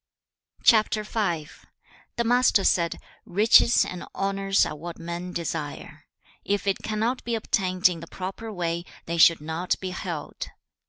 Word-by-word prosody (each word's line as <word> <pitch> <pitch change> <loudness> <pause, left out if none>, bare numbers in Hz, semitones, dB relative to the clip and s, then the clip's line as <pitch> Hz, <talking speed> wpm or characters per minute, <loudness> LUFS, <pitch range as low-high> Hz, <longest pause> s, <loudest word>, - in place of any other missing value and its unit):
The 215 -6 +2 0.8
Master 245 -4 +4
said, 170 -3 +1 0.2
'Riches 220 +5 +5
and 180 -1 -6
honours 195 0 +1
are - - -5
what 170 +3 -8
men 170 +2 -5
desire. 155 -2 -5 0.4
If 205 0 -1
it 195 0 +1
cannot 220 +4 -2
be 235 -1 -1
obtained 185 -4 +2
in 175 -2 -3
the 165 - -9
proper 195 +6 -6
way, 170 -3 -2 0.2
they 170 +1 -3
should 165 -1 +6
not 160 +4 -2
be 185 -1 -4
held. 170 -4 -5
185 Hz, 130 wpm, -25 LUFS, 170-210 Hz, 0.8 s, should